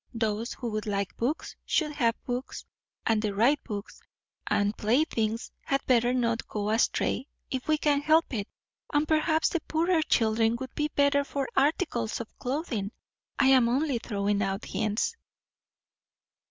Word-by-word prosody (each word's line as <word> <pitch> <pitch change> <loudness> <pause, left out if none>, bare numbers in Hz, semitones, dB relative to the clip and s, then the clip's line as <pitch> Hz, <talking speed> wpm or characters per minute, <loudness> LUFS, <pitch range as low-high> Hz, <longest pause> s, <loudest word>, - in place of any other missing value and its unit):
Those 225 +1 -1
who 240 -3 -5
would 215 0 -3
like 200 -1 -2
books 270 +8 -2
should 305 -2 +1
have 235 -6 +1
books, 245 +1 -4 0.4
and 220 -1 +2
the 210 -2 -2
right 255 +8 +3
books; 205 -3 -7 0.5
and 205 +1 +1
playthings 225 -2 0
had 275 0 -1
better 240 -1 +3
not 235 -2 0
go 210 0 -2
astray, 235 +3 +1 0.2
if 260 -1 -3
we 310 0 +3
can 290 -1 +2
help 315 0 +3
it; 205 -3 -2 0.4
and 295 +1 +2
perhaps 315 0 +2
the 340 - 0
poorer 330 +1 +1
children 225 -4 +2
would 260 +1 -6
be 300 - 0
better 285 0 +4
for 280 -1 -3
articles 270 - +1
of 230 - -8
clothing. 250 - -2 0.5
I 270 -1 +4
am 255 -3 +5
only 270 0 +1
throwing 205 -2 -1
out 195 +1 -2
hints." 215 - -1
240 Hz, 155 wpm, -28 LUFS, 220-290 Hz, 0.5 s, am